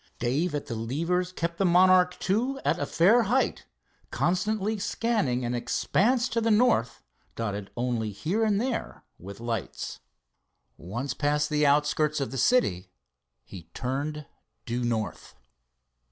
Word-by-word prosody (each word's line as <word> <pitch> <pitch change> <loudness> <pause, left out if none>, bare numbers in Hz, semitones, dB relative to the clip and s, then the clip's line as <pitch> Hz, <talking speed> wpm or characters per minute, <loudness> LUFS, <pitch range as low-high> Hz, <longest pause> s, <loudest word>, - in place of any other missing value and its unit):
Dave 145 +7 0
at 145 - -3
the - - -5
levers 165 +11 -1
kept 170 -1 -4
the - - +3
Monarch 180 0 +4
II 235 +8 +1
at - - +1
a - - -2
fair 200 +9 +4
height, 245 +5 0 0.4
constantly 205 +4 0
scanning 200 - 0
an 120 - -2
expanse 235 - +1
to 230 - 0
the 225 - +1
north 210 - +2 0.3
dotted 105 -3 -4
only 120 -3 -1
here 175 - -1
and 210 -2 +2
there 245 0 -3 0.2
with 100 +3 -10
lights. 115 -5 -4 0.8
Once 120 - -5
past 150 0 0
the 150 -1 +3
outskirts 150 +1 +2
of 135 - -3
the 135 - -3
city 115 - +2 0.5
he 85 +4 -12
turned 145 +4 -3 0.4
due 120 +1 -2
north. 115 -3 -3
150 Hz, 140 wpm, -27 LUFS, 120-200 Hz, 0.8 s, Monarch